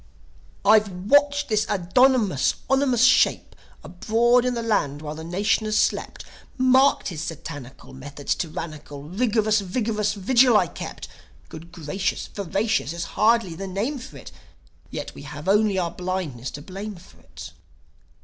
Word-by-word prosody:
"I've 215 0 +5 0.2
watched 285 0 +4
his 215 0 +1
abdominous, 205 - +2
ominous 265 -3 +2
shape 255 0 +3 0.3
Abroad 235 +6 +2
in 250 -1 0
the 235 - -3
land 145 -10 -1
while 150 0 -5
the 160 +1 -8
nation 200 +6 0
has 215 0 0
slept, - - -1 0.3
Marked 260 0 +3
his 160 -5 -6
satanical 145 -6 -8
Methods 140 +2 -4
tyrannical; 155 -3 -6
Rigorous, 215 +4 +1
vigorous 210 +2 -1
vigil 240 +3 +4
I - - +3
kept. - - -8 0.4
Good 165 +2 -11
gracious! 175 +3 -3
Voracious 200 -3 -1
is 170 0 -4
hardly 225 -4 +2
the 195 +4 -6
name 215 +10 -3
for 250 - -11
it! - - -11 0.6
Yet - - -6
we - - -11
have 150 +3 -9
only 205 0 +3
our 175 -2 -1
blindness 180 -9 -4
to 145 - -11
blame 200 +4 -7
for 175 +1 -17
it. - - -11
200 Hz, 145 wpm, -23 LUFS, 165-230 Hz, 0.6 s, I've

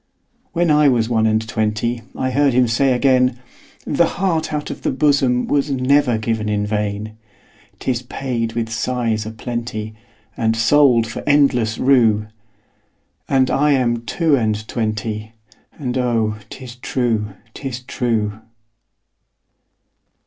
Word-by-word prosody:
When 170 -1 +2
I 150 -1 +5
was 115 -3 +1
one 110 -2 +2
and 110 0 +1
twentyI 115 +4 -2
heard 140 0 +2
him 125 0 +4
say 130 +4 +2
again,'The 125 +4 0
heart 170 -5 0
out 150 -1 -3
of - - -8
the - - 0
bosomWas 140 0 +2
never 130 -2 +2
given 110 -1 -2
in 105 -1 0
vain;'Tis 110 +3 -5
paid 120 -3 -3
with 115 -1 -3
sighs 110 -1 -1
a - - -5
plentyAnd 110 -1 -5
sold 120 0 +4
for 115 +2 -6
endless 130 -6 +3
rue.'And 110 +2 -1
I 145 +1 +3
am 120 -3 +1
two 165 -4 +2
and 110 -3 -1
twenty, 110 -1 -3 0.4
And 125 -4 -4
oh, 115 -4 0
'tis 125 -2 -10
true, 115 -5 -1 0.2
'tis 130 -3 -6
true. 115 -5 -2
120 Hz, 115 wpm, -19 LUFS, 110-130 Hz, 0.4 s, I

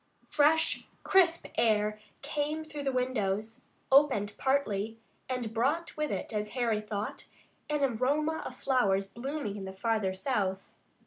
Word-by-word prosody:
Fresh 310 +2 +3 0.2
crisp 350 -3 +4
air 215 -2 +2 0.2
came 300 +1 -2
through 305 -2 -7
the 275 -1 0
windows, 225 -3 -1 0.3
opened 265 -8 +5
partly, 225 -6 0 0.3
and 245 -4 -2
brought 290 +9 0
with 305 -1 -1
it, 195 +3 -3
as 210 0 -1
Harry 230 -4 +1
thought, 210 -1 -4 0.4
an 295 -1 +1
aroma 285 +6 +1
of - - -7
flowers 200 -8 +2
blooming 235 0 -4
in 195 - -6
the 190 - -6
farther 200 -1 0
south. 195 -4 -1
240 Hz, 135 wpm, -30 LUFS, 210-290 Hz, 0.4 s, opened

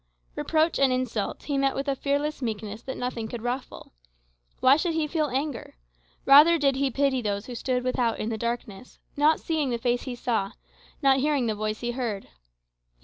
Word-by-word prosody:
Reproach 320 +1 +1
and 275 -1 +4
insult 255 -5 -2
he 285 -2 -1
met 275 0 +1
with 275 +1 -3
a 275 - +1
fearless 285 +2 -1
meekness 215 -2 -4
that 265 - -6
nothing 245 -3 -3
could 230 0 -7
ruffle. 245 - -5 0.7
Why 260 +2 +6
should 325 +2 -1
he 320 -1 +1
feel 305 0 0
anger? 270 - -4 0.5
Rather 300 +5 +8
did 275 -3 +2
he 275 0 +1
pity 270 0 +1
those 205 -1 -2
who 250 - -7
stood 250 +1 -1
without 250 -2 0
in 215 - -3
the 225 - -2
darkness, 235 -2 -5 0.2
not 300 +2 +3
seeing 310 -4 -1
the 240 - -1
Face 245 0 0
he 255 -2 -5
saw, 225 -4 -1 0.5
not 270 -1 +5
hearing 285 -2 +1
the 220 - 0
Voice 215 0 -3
he 240 0 -1
heard. 235 -5 -4
255 Hz, 190 wpm, -26 LUFS, 230-280 Hz, 0.7 s, Rather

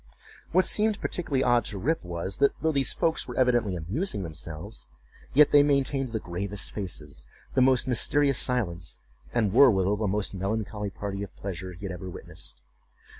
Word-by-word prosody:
What 185 +3 +4
seemed 215 0 +1
particularly 140 -7 -1
odd 120 -1 +3
to 105 - -3
Rip 155 - -1
was, 90 +2 -4
that 140 0 +2
though 160 - +1
these 140 -3 0
folks 165 -1 0
were 125 - -7
evidently 120 -6 +2
amusing 100 - -3
themselves, 80 +4 -7 0.5
yet 150 +1 +7
they 145 - +7
maintained 140 -2 +1
the 110 -1 -2
gravest 100 +2 -3
faces, 75 - -5 0.3
the 130 - +3
most 130 0 +4
mysterious 140 +2 +3
silence, 90 - -1 0.3
and 110 -5 +1
were, 135 +2 +8
withal, 100 -1 +1
the 105 0 -1
most 100 +1 0
melancholy 105 +2 -3
party 100 0 -5
of 100 -4 -7
pleasure 95 -1 -6
he 90 +4 -9
had 95 - -4
ever 90 +1 -7
witnessed. - - -11
105 Hz, 175 wpm, -27 LUFS, 95-135 Hz, 0.5 s, were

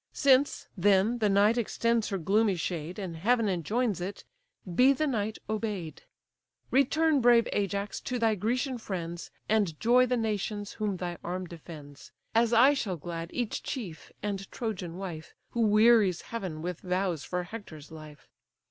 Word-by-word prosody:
Since, 275 0 +3
then, 205 +4 +3
the 215 -2 +2
night 205 +4 +4
extends 230 0 0
her 195 - -1
gloomy 200 +3 +2
shade, 170 0 -4
And 185 -5 -5
heaven 230 +5 +2
enjoins 200 +3 0
it, 190 +3 -5 0.5
be 260 +9 +6
the 310 +3 0
night 220 -6 -1
obey'd. 210 -7 -3 0.7
Return, 290 +2 +3
brave 235 -1 +5
Ajax, 200 0 -2
to 250 - -3
thy 225 -2 +2
Grecian 245 +5 -1
friends, 175 -5 -5 0.2
And 205 -8 +1
joy 250 +2 +4
the 250 0 +1
nations 210 -2 -2
whom 210 -4 -2
thy 175 -1 -5
arm 180 +1 -3
defends; 155 -4 -11 0.2
As 230 0 +3
I 250 +5 +6
shall 200 -10 -2
glad 165 +1 -6
each 240 -3 -2
chief, 195 - -6
and 195 -2 -3
Trojan 185 -7 -4
wife, 175 -5 -7 0.2
Who 235 - -1
wearies 215 -4 +5
heaven 185 -9 -5
with 180 -1 -4
vows 180 -4 -1
for 180 0 -3
Hector's 175 -7 -10
life. 150 -4 -12
205 Hz, 155 wpm, -29 LUFS, 175-230 Hz, 0.7 s, be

